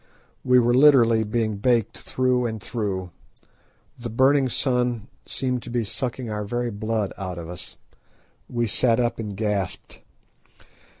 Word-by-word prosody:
We 125 0 +5
were 120 0 +4
literally 125 -5 +6
being 110 -1 -1
baked 115 0 +1
through 125 -1 0
and 110 -1 -4
through. 95 -6 -3 0.9
The 120 0 -5
burning 130 +3 +3
sun 125 -4 0 0.2
seemed 125 -2 -2
to 120 - -9
be 120 -1 0
sucking 125 +3 -4
our 105 -1 -3
very 120 +3 -2
blood 110 -1 -2
out 90 -2 -4
of 85 -1 -6
us. 90 +1 -8 0.7
We 120 -1 0
sat 115 +2 +2
up 120 -2 0
and 105 -3 -5
gasped. 105 -3 -2
115 Hz, 140 wpm, -24 LUFS, 105-125 Hz, 0.9 s, literally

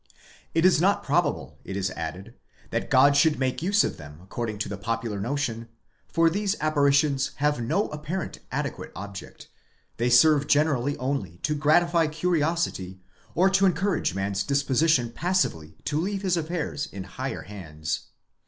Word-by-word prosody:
* - - -26
It 165 +1 +3
is 185 -4 +5
not 195 +3 +2
probable, - - -1
it 95 - -5
is 95 -2 -1
added, 90 +7 -6 0.4
that - - -2
God 140 +2 +5
should 150 +1 +4
make 130 +1 -1
use 200 +5 +3
of - - -3
them 75 0 -11
according 110 +2 -4
to 105 - -2
the 105 - -4
popular 115 -1 -3
notion, 115 -1 -2 0.4
for 165 0 +3
these 200 +4 0
apparitions 140 -2 +2
have 145 -2 0
no 195 - 0
apparent 155 +5 -5
adequate - - -4
object, 100 0 -9 0.5
they 120 +2 +1
serve 145 +4 +5
generally 145 -2 +2
only 125 - -3
to 150 - +1
gratify 165 +3 +3
curiosity, 155 - -1 0.4
or 185 +3 +4
to 195 0 +4
encourage 180 - 0
man's 100 0 -1
disposition 140 -2 +2
passively 150 - -1
to 150 +1 0
leave 195 +2 -2
his 185 -2 +2
affairs 160 -3 -3
in 95 -1 -6
higher - - -5
hands.! 80 -6 -5
145 Hz, 155 wpm, -26 LUFS, 105-165 Hz, 0.5 s, is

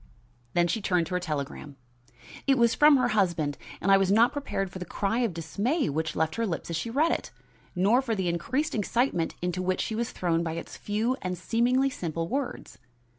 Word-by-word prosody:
Then 175 0 +4
she 220 +6 -1
turned 180 -3 +1
to 180 - -6
her 180 - +1
telegram. 150 -3 -5 0.7
It 270 -1 +4
was 235 -1 +4
from 295 -1 +6
her 255 - +2
husband, 170 -8 +1 0.2
and 195 - +1
I 195 - +8
was 195 -1 +2
not 230 +4 +5
prepared 195 -10 -3
for 190 - -7
the - - -3
cry 200 +6 -1
of 235 -4 +1
dismay 200 - -1
which 155 +1 -2
left 160 0 0
her 230 -1 0
lips 170 -1 -4
as - - -1
she 230 - -2
read 305 +8 +2
it, - - -2 0.5
nor 205 +8 +4
for 235 -4 -1
the 190 -3 -1
increased 260 - -1
excitement 215 -4 0
into 180 0 -1
which 185 0 0
she - - -3
was 235 +2 -2
thrown 170 -2 0
by 165 -1 -2
its 165 - -7
few 220 +5 -1
and 180 -1 -3
seemingly 245 +8 +2
simple 165 -5 -3
words. 270 +4 -4
195 Hz, 210 wpm, -27 LUFS, 170-235 Hz, 0.7 s, I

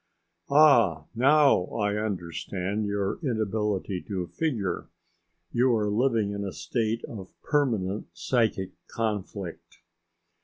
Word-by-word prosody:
"Ah! 120 - +5
now 140 -4 +5
I 105 -1 0
understand 100 0 -3
your 100 -1 -1
inability 105 - -1
to 95 -4 -2
figure. 105 - -2 0.6
You 125 0 +3
are 105 -2 0
living 115 -2 +2
in 100 0 -3
a 95 -2 -4
state 110 - -2
of 95 -5 -8
permanent 110 -10 0
psychic 110 -6 0 0.2
conflict. 105 -5 -4
105 Hz, 105 wpm, -27 LUFS, 95-120 Hz, 0.6 s, Ah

